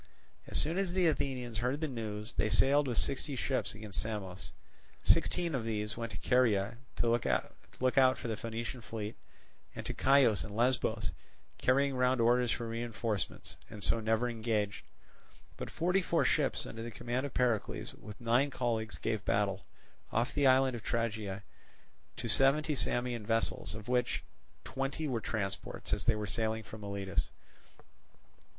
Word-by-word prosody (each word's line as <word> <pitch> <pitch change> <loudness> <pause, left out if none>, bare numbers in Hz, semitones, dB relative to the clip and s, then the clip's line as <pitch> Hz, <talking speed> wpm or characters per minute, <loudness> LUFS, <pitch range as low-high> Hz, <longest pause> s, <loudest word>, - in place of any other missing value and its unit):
As - - +1
soon 165 +5 +2
as 190 -3 0
the 185 -1 +3
Athenians 125 -7 0
heard 125 +5 0
the 160 - -1
news, 110 -4 -4
they 110 - +1
sailed 135 +7 +4
with 120 -3 -1
sixty 140 +1 0
ships 130 -2 0
against 105 -2 -4
Samos. 95 -7 -5 0.5
Sixteen 170 -2 +3
of 130 -4 -1
these 110 0 -2
went 115 -1 -4
to - - -5
Caria 115 -4 +2 0.2
to - - +1
look 115 0 +2 0.7
out 130 0 +5
for 120 - -5
the 110 - -1
Phoenician 115 +2 -5
fleet, 110 -1 -5 0.6
and - - -6
to - - -2
Chios 130 -6 +4
and 105 - -7
Lesbos 115 -2 +1 0.5
carrying 135 +1 +3
round 125 0 +3
orders 120 +1 +4
for 115 - -2
reinforcements, 115 -2 -3
and 105 -3 -7
so 115 - +3
never 110 +2 +1
engaged; 110 -3 -1 0.7
but - - -6
forty 180 +3 +1
four 170 -2 +2
ships 150 -4 +1
under 115 - -7
the 115 - -4
command 120 +4 -2
of 140 - -13
Pericles 120 -4 0
with 105 -2 -11
nine 120 +4 +3
colleagues 115 -4 -1
gave 110 -3 -2
battle, 100 -1 0 0.4
off 115 +3 0
the 145 -2 +3
island 130 -1 +5
of 115 - -6
Tragia, 110 -4 -2 0.7
to 120 - -4
seventy 135 +7 +4
Samian 120 -4 0
vessels, 115 0 0
of 110 -1 -8
which 125 0 +1 0.4
twenty 135 +3 -2
were 120 -5 -1
transports, 100 -3 -3
as 105 - 0
they 115 - +4
were 105 0 -2
sailing 110 +1 -1
from 110 +2 -10
Miletus. 100 -2 -2
115 Hz, 160 wpm, -33 LUFS, 110-130 Hz, 0.7 s, out